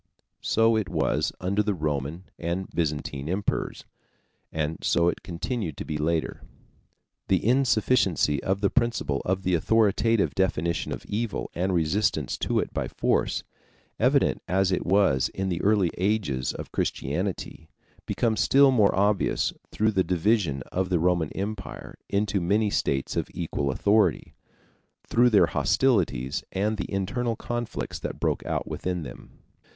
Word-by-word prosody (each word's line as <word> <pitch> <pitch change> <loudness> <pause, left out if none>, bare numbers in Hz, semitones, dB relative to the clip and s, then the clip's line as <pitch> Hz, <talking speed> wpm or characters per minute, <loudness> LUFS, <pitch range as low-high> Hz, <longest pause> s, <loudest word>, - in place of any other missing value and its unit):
So 115 0 +3
it 105 -4 -1
was - - 0
under 100 +3 +1
the 105 -1 0
Roman 75 +1 -3 0.2
and 85 +3 -2
Byzantine 75 -3 -2
emperors, 100 +3 -2 0.7
and 80 0 -2
so 85 0 +3
it - - -4
continued 90 - -4
to - - -5
be 75 -1 -3
later. 80 +1 -1 0.9
The 95 0 +1
insufficiency 110 - +2
of 95 +1 -1
the 100 - +2
principle 115 - 0
of 95 +1 -1
the 90 - +1
authoritative 110 +4 +2
definition 85 -3 0
of - - -5
evil 110 +1 -3
and 95 +2 -1
resistance 85 -2 +1
to - - 0
it - - -1
by - - -2
force, - - 0 0.6
evident - - +3
as 95 +1 +2
it 90 - -1
was 90 -9 +3
in 95 0 -3
the 85 -1 -2
early 100 -4 +3
ages 90 - 0
of - - -8
Christianity, 80 +1 -3 0.4
becomes 115 -2 0
still 140 0 +5
more 105 -6 +3
obvious 100 0 +1 0.2
through 110 +1 +1
the 95 -3 +2
division 90 - +1
of 95 0 -1
the 90 - +2
Roman 85 -2 +1
Empire 100 0 -6
into 100 -1 0
many 105 +4 +1
states 65 -7 -1
of - - -1
equal 80 -4 -2
authority, 100 +5 +2 0.7
through 120 +1 +4
their 105 -4 +5
hostilities 90 - +1
and 105 +3 0
the 100 - -5
internal 115 +5 -1
conflicts 120 +1 -4
that - - -5
broke - - 0
out - - -2
within 90 -2 -3
them. - - -11
95 Hz, 145 wpm, -26 LUFS, 85-105 Hz, 0.9 s, still